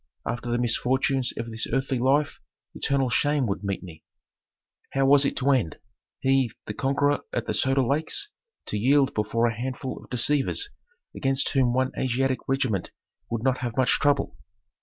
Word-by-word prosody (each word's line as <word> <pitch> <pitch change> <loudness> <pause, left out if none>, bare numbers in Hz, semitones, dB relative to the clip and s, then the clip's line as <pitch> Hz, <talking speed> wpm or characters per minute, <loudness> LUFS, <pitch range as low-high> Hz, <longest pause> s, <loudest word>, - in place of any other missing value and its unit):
After 120 0 -3
the 120 - +1
misfortunes 125 +2 +1
of 115 0 -4
this 110 0 -2
earthly 135 -1 0
life 140 +4 +1 0.3
eternal 135 -3 0
shame 145 +2 +2
would 100 -1 -3
meet 100 -1 -3
me. 80 -3 -11 0.9
How 135 0 +2
was 140 +1 +6
it - - 0
to 140 +2 +2
end? 120 - +1 0.4
He, 135 -3 +2
the 105 - -4
conqueror 140 +4 +1
at 120 - -2
the - - -2
Soda 135 0 +2
Lakes, 155 - -1 0.4
to 105 - -3
yield 135 +4 +3
before 110 +2 0
a 115 - +1
handful 130 +2 -5
of - - -17
deceivers 140 - +1 0.4
against 135 0 +1
whom 130 -3 +2
one 130 0 +1
Asiatic 130 +1 0
regiment 130 -8 0 0.4
would 115 -1 -3
not 130 -1 +1
have 120 -1 -4
much 130 -1 +3
trouble? 145 -2 +1
130 Hz, 165 wpm, -26 LUFS, 120-135 Hz, 0.9 s, was